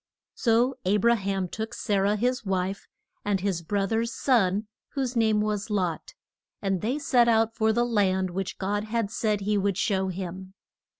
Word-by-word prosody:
So 235 Hz, +2 st, +2 dB
A 195 Hz, +3 st, +2 dB
bra 235 Hz, +3 st, +4 dB
ham 195 Hz, -3 st, -2 dB
took 220 Hz, +5 st, -5 dB
Sa 205 Hz, -2 st, 0 dB
rah, 200 Hz, +2 st, +2 dB
his 250 Hz, +4 st, 0 dB
wife, 190 Hz, 0 st, -2 dB, 0.4 s
and 205 Hz, -2 st, 0 dB
his 185 Hz, -3 st, -1 dB
bro 195 Hz, +4 st, 0 dB
ther's 225 Hz, +3 st, 0 dB
son, 215 Hz, -6 st, +2 dB, 0.3 s
whose 265 Hz, -2 st, -2 dB
name 220 Hz, -2 st, +3 dB
was 210 Hz, 0 st, -2 dB
Lot, 185 Hz, -6 st, -2 dB, 0.4 s
and 195 Hz, -3 st, -1 dB
they 245 Hz, +6 st, 0 dB
set 250 Hz, -5 st, +3 dB
out 225 Hz, -1 st, +3 dB
for 220 Hz, 0 st, +2 dB
the 240 Hz, +2 st, +2 dB
land 190 Hz, -5 st, +1 dB
which 190 Hz, +1 st, -4 dB
God 205 Hz, +2 st, -1 dB
had 220 Hz, -2 st, -1 dB
said 215 Hz, -3 st, 0 dB
he 205 Hz, +1 st, +1 dB
would 195 Hz, -1 st, 0 dB
show 190 Hz, -2 st, +1 dB
him. 185 Hz, +1 st, -6 dB
205 Hz, 180 wpm, -26 LUFS, 190-225 Hz, 0.4 s, bra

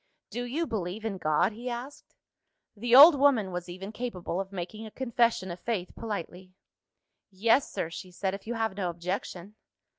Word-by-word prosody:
"Do 245 Hz, 0 st, -3 dB
you 295 Hz, +8 st, -1 dB
believe 210 Hz, -, -4 dB
in 200 Hz, -4 st, -3 dB
God?" 155 Hz, +4 st, +2 dB
he 235 Hz, +4 st, -6 dB
asked. 245 Hz, +4 st, -8 dB, 0.6 s
The 235 Hz, +3 st, +2 dB
old 300 Hz, +6 st, +11 dB
woman 265 Hz, -9 st, +3 dB
was 180 Hz, 0 st, -5 dB
even 190 Hz, +3 st, -7 dB
capable 195 Hz, -6 st, -3 dB
of 195 Hz, 0 st, -8 dB
making 195 Hz, +4 st, -6 dB
a 220 Hz, -, -7 dB
confession 235 Hz, -6 st, 0 dB
of 175 Hz, -, -7 dB
faith 200 Hz, -5 st, -3 dB
politely. 185 Hz, -4 st, -6 dB, 0.8 s
"Yes, 225 Hz, +7 st, +2 dB
sir," 165 Hz, -, -3 dB
she 185 Hz, +2 st, -8 dB
said, 190 Hz, +1 st, -2 dB
"if 195 Hz, +2 st, -8 dB
you 240 Hz, -, -2 dB
have 225 Hz, -3 st, -1 dB
no 190 Hz, -3 st, -1 dB
objection." 180 Hz, +2 st, -5 dB
205 Hz, 175 wpm, -28 LUFS, 180-235 Hz, 0.8 s, old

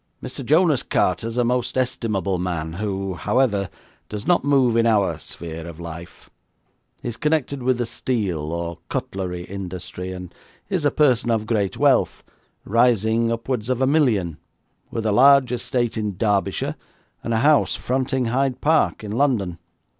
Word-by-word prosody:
'Mr. -, -, -6 dB
Jonas 155 Hz, 0 st, +3 dB
Carter 90 Hz, -1 st, 0 dB
is 115 Hz, +1 st, -5 dB
a 125 Hz, -, +3 dB
most 125 Hz, +1 st, 0 dB
estimable 105 Hz, -7 st, -1 dB
man, 85 Hz, -3 st, -3 dB
who, 95 Hz, 0 st, -3 dB
however, 100 Hz, +2 st, +1 dB, 0.4 s
does 105 Hz, 0 st, -6 dB
not 175 Hz, -5 st, +3 dB
move 135 Hz, -4 st, +3 dB
in 115 Hz, 0 st, +3 dB
our 100 Hz, -8 st, +2 dB
sphere 80 Hz, +1 st, -8 dB
of 85 Hz, -1 st, -9 dB
life. 85 Hz, 0 st, -9 dB, 0.8 s
He -, -, -4 dB
is 120 Hz, -, -6 dB
connected 150 Hz, -3 st, 0 dB
with 125 Hz, 0 st, +1 dB
the 120 Hz, -, -1 dB
steel 95 Hz, -11 st, -2 dB
or 85 Hz, 0 st, -4 dB
cutlery 90 Hz, -2 st, -3 dB
industry, 90 Hz, -1 st, -6 dB
and 90 Hz, -1 st, -8 dB, 0.4 s
is 185 Hz, -7 st, -1 dB
a -, -, +5 dB
person 130 Hz, -6 st, +2 dB
of 110 Hz, -2 st, +1 dB
great 105 Hz, -4 st, -1 dB
wealth, -, -, +2 dB, 0.4 s
rising 115 Hz, 0 st, +2 dB
upwards 115 Hz, 0 st, -2 dB
of 130 Hz, -1 st, 0 dB
a 130 Hz, -, +3 dB
million, 115 Hz, -, +2 dB, 0.5 s
with 115 Hz, -1 st, -4 dB
a 110 Hz, -, +2 dB
large 135 Hz, +2 st, +6 dB
estate 120 Hz, -1 st, -1 dB
in 105 Hz, -4 st, -3 dB
Derbyshire, 100 Hz, -2 st, 0 dB, 0.5 s
and 115 Hz, -, -3 dB
a 115 Hz, -, +2 dB
house 150 Hz, -1 st, +4 dB
fronting 130 Hz, 0 st, -1 dB
Hyde 130 Hz, +2 st, 0 dB
Park, 155 Hz, -6 st, +2 dB
in 105 Hz, -, -5 dB
London. 110 Hz, -9 st, 0 dB
115 Hz, 160 wpm, -22 LUFS, 95-130 Hz, 0.8 s, large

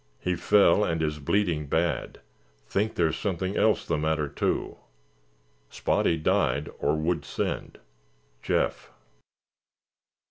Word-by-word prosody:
He 90 Hz, -, -1 dB
fell 105 Hz, +1 st, +4 dB
and 80 Hz, -4 st, 0 dB
is 75 Hz, -1 st, -2 dB
bleeding 80 Hz, -1 st, 0 dB
bad. 80 Hz, 0 st, -1 dB, 0.4 s
Think 105 Hz, -, -1 dB
there's 80 Hz, -2 st, +1 dB
something 95 Hz, 0 st, -2 dB
else 110 Hz, -1 st, +2 dB
the 80 Hz, -2 st, -1 dB
matter, 80 Hz, -1 st, 0 dB
too. 70 Hz, -, -2 dB, 0.9 s
Spotty 85 Hz, -, +1 dB
died 75 Hz, -1 st, +1 dB
or 75 Hz, +2 st, +1 dB
would 80 Hz, 0 st, -1 dB
send. 70 Hz, -, -4 dB, 0.6 s
Jeff." -, -, -1 dB
80 Hz, 110 wpm, -27 LUFS, 75-95 Hz, 0.9 s, fell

